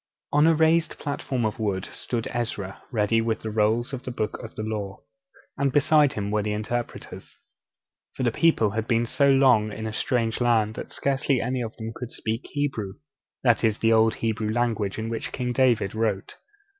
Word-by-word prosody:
On 150 +2 +5
a 165 - +5
raised 160 +1 +3
platform 135 -4 -2
of 110 +1 -2
wood 100 -4 -1
stood 115 -2 -3
Ezra 105 -5 -3
ready 115 -1 +2
with 115 -1 -1
the 110 - -4
rolls 110 +4 +1
of 130 - -4
the 130 - -6
Books 110 -3 -3
of 115 - -9
the 110 - -4
Law, 105 -3 -4 0.6
and 140 -1 +2
beside 145 +1 +4
him 100 -1 -3
were 105 0 +1
the 105 0 -2
interpreters. 115 +3 -5 0.8
For - - -3
the 120 - +2
people 115 -8 +3
had 110 +2 -2
been 115 0 +2
so 140 +4 +2
long 130 -6 +4
in 110 +2 -6
a 110 - -4
strange 115 0 0
land 110 -3 +3
that - - -7
scarcely 135 -1 0
any 125 +2 -1
of 115 -2 -5
them 110 0 -5
could 125 +1 -7
speak 115 +3 -3
Hebrew; 135 -10 -2 0.5
that 120 -3 +3
is, 110 -2 +2
the 115 0 +3
old 110 0 +4
Hebrew 110 -1 -1
language 110 -4 0
in 110 0 -3
which 115 0 -4
King 125 -2 -2
David 120 -6 +2
wrote. 110 -3 -1
115 Hz, 195 wpm, -25 LUFS, 110-125 Hz, 0.8 s, On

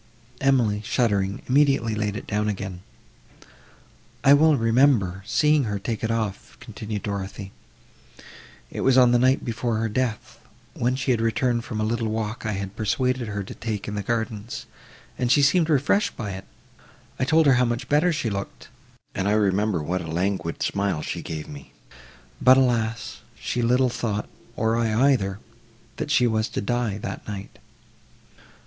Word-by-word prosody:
Emily, 120 -7 +2
shuddering, 100 -4 0
immediately 135 -4 +3
laid 105 -1 -2
it - - -6
down 105 +1 -1
again. 95 -3 -5 1.4
"I 140 - +7
well 155 +1 +5
remember 115 -6 +3
seeing 150 +3 +3
her 100 -2 -2
take 110 +3 -4
it 110 - 0
off," 110 -4 -3
continued 105 -1 -6
Dorothée, 100 -1 -5 1.2
"it - - -4
was 130 -1 +4
on 125 -2 +6
the 120 - +4
night 130 +2 +2
before 115 -1 -1
her 110 +1 0
death, 115 -1 -3 0.3
when 125 -5 0
she 135 0 -1
had 115 -2 +1
returned 115 +1 +1
from 110 -2 -4
a - - 0
little 115 +1 -1
walk 110 0 -3
I 105 - -1
had 100 0 -5
persuaded 125 +2 0
her 100 -1 -3
to - - -9
take 110 -3 -4
in 105 - -4
the 105 - -2
gardens, 110 +1 -3 0.5
and 125 -1 +1
she 145 +1 +5
seemed 165 +3 +3
refreshed 150 +8 +2
by 105 -4 -4
it. 95 0 -7 0.7
I - - +1
told 160 +4 +4
her 140 - +6
how 125 0 +3
much 120 +2 -2
better 150 +5 +3
she 125 -8 -2
looked, 100 0 -6 0.4
and 95 - -1
I 105 - +3
remember 100 -4 +1
what 90 +4 -2
a 85 - -7
languid 85 0 -2
smile 100 -6 -1
she - - -4
gave 80 -2 -6
me; 70 -2 -11 0.7
but, 130 +1 +7
alas! 115 -3 0 0.2
she 125 - -2
little 125 +2 +3
thought, 105 -3 -2 0.3
or 110 +1 +1
I 115 +4 +3
either, 95 -7 0 0.6
that - - -4
she 125 - +4
was 110 -2 +1
to - - -3
die 120 -1 -1
that 105 - -6
night." 100 -1 -7
115 Hz, 170 wpm, -24 LUFS, 100-125 Hz, 1.4 s, I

